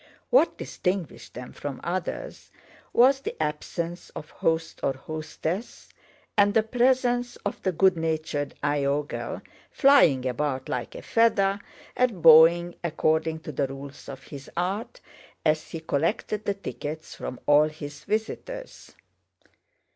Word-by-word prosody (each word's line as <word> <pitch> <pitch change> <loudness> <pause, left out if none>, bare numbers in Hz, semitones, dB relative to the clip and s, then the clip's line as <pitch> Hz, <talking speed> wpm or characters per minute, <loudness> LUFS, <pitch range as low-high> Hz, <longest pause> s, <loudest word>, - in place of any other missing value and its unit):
What - - +4
distinguished 180 -3 -3
them 125 +1 -8
from 145 -2 -6
others 185 - -4 0.4
was 265 +3 +5
the - - -5
absence 165 +3 -3
of 155 - -8
host 165 0 -1
or 135 - +1
hostess 155 - -5 0.5
and 205 -1 +4
the 220 - +5
presence 245 +1 +2
of 205 - -3
the 190 - +1
good 185 +2 +4
natured 155 -3 -2
Iogel, 145 0 -1 0.3
flying 175 - +5
about 130 +1 -1
like 125 - -4
a - - -8
feather 200 -4 +3 0.4
and 235 -9 +1
bowing 165 +2 +8
according 160 0 0
to 155 - -6
the 140 -1 0
rules 135 +1 -9
of 135 -1 -8
his 140 -2 -10
art, 200 - -2 0.4
as 155 0 +1
he 165 - -5
collected 165 +7 -1
the 200 - 0
tickets 160 -5 -6
from 125 - -6
all 145 +1 +6
his 145 -2 -9
visitors. 225 - -4
165 Hz, 130 wpm, -26 LUFS, 145-205 Hz, 0.5 s, bowing